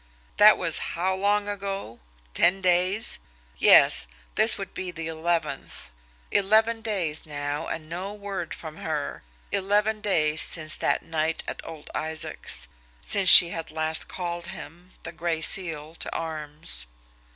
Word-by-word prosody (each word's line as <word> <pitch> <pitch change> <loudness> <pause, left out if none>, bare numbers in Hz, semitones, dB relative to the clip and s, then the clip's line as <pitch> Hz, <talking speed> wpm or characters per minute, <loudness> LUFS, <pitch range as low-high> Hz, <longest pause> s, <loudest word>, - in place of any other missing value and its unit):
That 210 +1 +7
was 165 -3 0 0.2
how 185 +2 0
long 205 +2 0
ago? 195 - -6 0.3
Ten 180 +3 +3
days? 185 +3 +1 0.4
Yes; - - +6 0.3
this - - +5
would - - -8
be 185 0 -5
the 165 -2 -7
eleventh. 165 - -4 0.4
Eleven 220 +3 +2
days 185 -9 -2
now 145 +1 -4
and 155 -1 -6
no 180 +5 -6
word 200 -5 -6
from 155 -1 -10
her 150 -2 -4 0.3
eleven 210 +2 0
days 155 -7 +2
since 155 -1 +1
that - - -1
night 160 0 -2
at - - -6
old 160 -2 -11
Isaac's, 155 - -3 0.3
since 190 - +3
she 170 - +11
had 165 -1 -6
last 160 0 +1
called 175 -1 -5
him, 175 0 -11
the - - -6
Gray 170 -1 -3
Seal, 160 -2 +1
to - - -5
arms. 150 - -4
170 Hz, 140 wpm, -25 LUFS, 155-195 Hz, 0.4 s, she